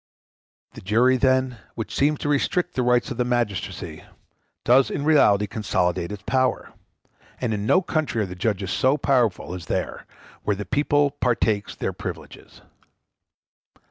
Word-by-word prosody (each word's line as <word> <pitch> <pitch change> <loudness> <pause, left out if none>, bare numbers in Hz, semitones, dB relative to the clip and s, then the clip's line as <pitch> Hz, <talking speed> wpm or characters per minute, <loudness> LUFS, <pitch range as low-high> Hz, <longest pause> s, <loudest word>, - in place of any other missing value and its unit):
] - - -49
The - - -10
jury, 115 +7 +3
then, 130 -2 +1 0.2
which 115 - -5
seems 150 +2 +2
to - - -2
restrict 175 +5 0
the 130 - 0
rights 125 +1 +2
of 125 - -5
magistracy, 120 -5 -2 0.6
does 130 +3 +5
in 140 - -3
reality 105 -10 +4
consolidate 90 -4 -1
its 100 -2 -7
power, 130 -2 0 0.7
and 120 -3 -1
in 105 0 -3
no 185 +8 +4
country 155 -10 -1
are - - -1
the 90 - -7
judges 95 0 -2
so 130 +8 +2
powerful 120 -11 +1
as 90 -4 -8
there, - - -3 0.3
where 105 - 0
the 105 +1 -6
people 145 +5 +2
partakes 110 -6 0
their - - -3
privileges. - - -9
120 Hz, 150 wpm, -23 LUFS, 105-135 Hz, 0.7 s, does